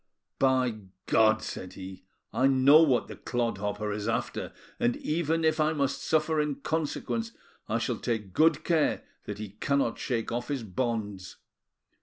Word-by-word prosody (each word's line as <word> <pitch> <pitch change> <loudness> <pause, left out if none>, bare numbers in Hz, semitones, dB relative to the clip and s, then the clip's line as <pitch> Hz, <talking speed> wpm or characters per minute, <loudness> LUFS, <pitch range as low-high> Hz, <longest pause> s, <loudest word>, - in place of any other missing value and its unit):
"By 130 -4 +2 0.3
God!" 110 0 +4
said 90 0 -6
he, 95 -1 -9 0.3
"I 130 - +3
know 135 +3 +7
what 135 -7 +3
the - - -8
clodhopper 105 -3 -2
is 105 +1 -3
after; 115 - -2 0.3
and 120 0 +1
even 165 +1 0
if 155 0 +2
I 155 +1 +3
must 140 -2 -1
suffer 155 0 +2
in 150 -2 -1
consequence, 165 +11 -2 0.4
I 110 - +1
shall 120 0 -1
take 110 -6 -3
good 155 -1 +4
care 165 -3 +1 0.2
that 105 - -5
he 105 -1 -6
cannot 140 -5 +1
shake 115 -3 -2
off 120 +1 -2
his 140 -5 -2
bonds. 105 -3 -3
125 Hz, 155 wpm, -28 LUFS, 110-150 Hz, 0.4 s, know